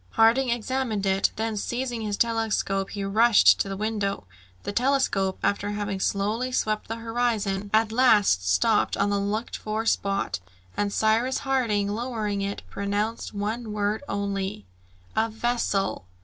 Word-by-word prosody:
Harding 235 +4 +4
examined 235 -3 -1
it; 195 0 +2
then 220 0 -2
seizing 240 +2 -3
his 210 -2 -2
telescope 220 -4 0
he 200 - -4
rushed 220 +3 +5
to 195 - -1
the 195 - -4
window. 210 - -2 0.4
The - - -3
telescope, 235 -6 +1
after 200 0 0
having 205 -1 -3
slowly 210 +7 -1
swept 215 -3 -1
the 225 - -3
horizon, 225 -4 -1
at 220 0 +3
last 205 - +4
stopped 220 - +2
on 200 +1 +1
the 200 - +1
looked 210 +3 -2
for 215 +1 -3
spot, 195 - 0 0.4
and 205 0 0
Cyrus 225 +5 +2
Harding 235 -7 +1
lowering 215 -2 -2
it, 200 0 -3
pronounced 205 +3 -3
one 215 +2 -3
word 210 +2 -1
only, 195 - -3 0.5
"A 225 +1 +2
vessel!" 220 - -1
215 Hz, 145 wpm, -25 LUFS, 200-230 Hz, 0.5 s, rushed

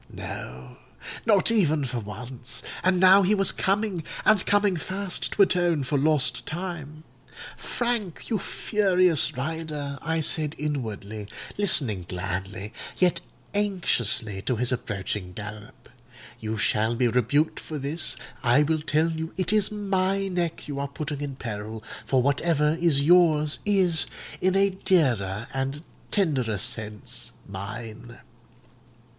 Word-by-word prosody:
No—not 65 - -2
even 160 -10 +2
for 125 -1 -3
once; 120 +4 -4 0.2
and 185 0 +3
now 190 +2 +8
he 200 +3 +3
was 195 -2 +5
coming—and 195 0 0
coming 205 -2 +3
fast—to 190 +4 0
atone 175 -5 +2
for 135 +3 -2
lost 145 -1 +2
time. 160 -3 -5 0.5
'Frank! 235 -8 -3
you 220 - 0
furious 185 - +2
rider,' 150 -1 -4
I 160 +1 -1
said 155 0 0
inwardly, 110 -8 -4 0.3
listening 130 - +3
gladly, 95 +3 -4 0.2
yet 175 -2 +3 0.3
anxiously, 120 - +1
to 125 - -1
his 125 +2 0
approaching 100 -5 -3
gallop, 105 +1 -9 0.5
'you 110 0 -3
shall 110 +2 +1
be 125 +1 +2
rebuked 125 +6 +1
for 155 - -6
this: 145 +3 -2 0.3
I 125 +4 +4
will 155 +1 0
tell 155 +2 +1
you 160 +1 -5
it 185 +2 +1
is 210 -2 +3
my 195 -1 0
neck 175 -3 -2
you 140 -2 -4
are 140 - -2
putting 145 0 -5
in 140 -2 -4
peril; 110 -3 -6 0.2
for 130 +2 +3
whatever 150 +2 +2
is 150 -5 +3
yours 155 -2 +4
is, 180 -7 +3 0.3
in 185 0 +2
a 195 0 +4
dearer 120 - +1
and 135 +3 -3 0.3
tenderer 135 - +1
sense, 105 -1 -4
mine. 110 +4 -8
150 Hz, 125 wpm, -26 LUFS, 120-180 Hz, 0.5 s, now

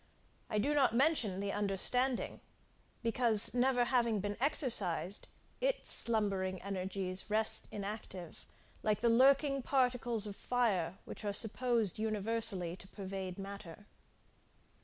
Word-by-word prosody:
I 215 - -1
do 280 +8 +1
not 270 -5 +3
mention 240 - +2
the 200 0 -2
understanding, 210 +6 +1 0.6
because 230 -2 +2
never 250 0 +2
having 235 -3 +1
been 205 +1 -3
exercised, 210 - +2 0.3
its - - 0
slumbering 195 -5 +2
energies 190 0 -3
rest 215 +1 +1
inactive, 200 -4 -7 0.3
like 215 -1 0
the 235 - +3
lurking 275 +3 +4
particles 245 -4 0
of 205 -1 -6
fire 195 -9 0
which - - -9
are 205 -1 -2
supposed 225 -1 0
universally 215 -4 -1
to 190 - -14
pervade 190 -2 -6
matter. 200 -1 -9
215 Hz, 115 wpm, -34 LUFS, 195-245 Hz, 0.6 s, lurking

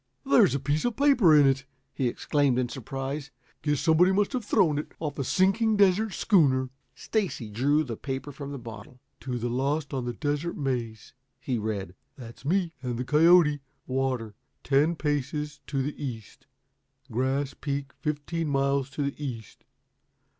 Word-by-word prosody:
"There's 140 -1 +5
a - - 0
piece 145 +3 -1
of 240 -2 0
paper 260 - +5
in 145 - +6
it," 135 0 +2 0.3
he 130 - 0
exclaimed 140 +1 +1
in 125 -1 0
surprise. 135 +3 -5 0.3
"Guess 150 -2 0
somebody 165 +4 +4
must 205 +5 +1
have 250 -3 -1
thrown 180 -8 +2
it 150 - -7
off 150 -3 -4
a - - 0
sinking 195 - +2
desert 200 +1 +3
schooner." 135 - +3 0.2
Stacy 185 - -2
drew 145 +8 +2
the 120 -6 -5
paper 135 +3 -5
from 140 0 -7
the 140 - -5
bottle. 115 0 -10 0.2
"'To 125 -2 -4
the 120 0 -2
lost 140 +5 -1
on 130 -2 -2
the 120 - -3
Desert 145 +6 -2
Maze,'" 120 -6 -3 0.3
he 130 -2 -2
read 100 -4 -3 0.2
"That's 120 -2 -11
me 170 +3 0
and 125 -2 -3
the 125 - -3
coyote. 155 0 +5 0.3
'Water 130 -4 -2 0.3
ten 145 +5 +3
paces 150 0 -2
to 135 -2 -1
the 145 +1 -5
east. 115 -7 -7 0.6
Grass 135 +3 0
Peak 140 0 -4
fifteen 155 +2 -2
miles 140 -1 +1
to 140 +2 -3
the 140 +1 -4
east. 115 -6 -7
140 Hz, 165 wpm, -27 LUFS, 130-155 Hz, 0.6 s, in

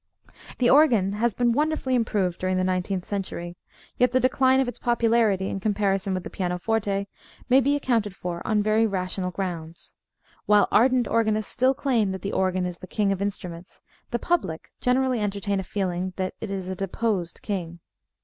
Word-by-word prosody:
The 250 - +2
organ 240 -9 +5
has 225 +1 0
been 245 -1 +2
wonderfully 295 0 0
improved 205 -7 0
during 185 0 0
the 185 - +1
nineteenth 185 0 -1
century. 175 -3 -4 0.4
Yet 250 0 +4
the 255 - +4
decline 260 +1 +3
of 265 - +1
its 245 - -6
popularity 230 -5 +2
in 195 - -3
comparison 195 -2 0
with 185 - -3
the - - -6
pianoforte 200 +2 -1 0.4
may 260 +2 +6
be 280 +3 +2
accounted 230 -8 0
for 175 -2 -5
on 210 -1 +1
very 215 +1 +3
rational 185 -2 -2
grounds. 170 -3 -6 0.5
While 210 -1 +5
ardent 250 0 +4
organists 215 -2 +1
still 260 +2 +2
claim 240 -8 +1
that 190 - -7
the 200 - -3
organ 185 -1 +1
is 180 -1 -5
the 185 - -10
"King 200 +1 0
of 195 -1 -2
Instruments" 180 -3 -5 0.3
the 240 - -1
public 235 - -2
generally 255 -1 +2
entertain 200 -1 -1
a - - -3
feeling 185 -1 -2
that 185 -1 -2
it - - -4
is 190 -2 -4
a 190 - -3
deposed 195 -1 -2
king. 175 -5 -4
200 Hz, 180 wpm, -25 LUFS, 185-235 Hz, 0.5 s, may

